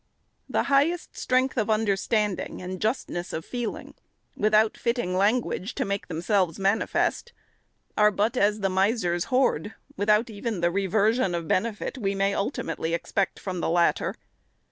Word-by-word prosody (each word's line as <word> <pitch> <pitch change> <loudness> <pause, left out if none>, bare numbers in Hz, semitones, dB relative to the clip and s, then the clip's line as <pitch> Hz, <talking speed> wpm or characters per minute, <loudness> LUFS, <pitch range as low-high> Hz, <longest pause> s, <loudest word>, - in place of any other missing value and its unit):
The - - +1
highest 295 +6 +1
strength 255 +1 +1
of 220 - -1
understanding 210 -1 0
and 185 0 -6
justness 215 -6 -2
of 160 - -4
feeling, 240 -3 -5 0.4
without 215 +1 +3
fitting 235 -7 -1
language 210 +1 0
to - - -1
make 200 -1 -3
themselves 180 0 0
manifest, 205 - 0 0.6
are 210 0 +5
but 210 +4 0
as 210 -2 +2
the 195 - +1
miser's 190 -2 +1
hoard, 250 - +1 0.2
without 210 +3 +3
even 215 -1 -3
the 175 0 +2
reversion 200 +1 +1
of 170 -2 -4
benefit 220 - -1
we 195 -3 -1
may 195 0 +1
ultimately 170 -4 -2
expect 190 +3 -1
from 185 -2 -4
the - - -1
latter. 170 0 +2
205 Hz, 145 wpm, -26 LUFS, 185-225 Hz, 0.6 s, are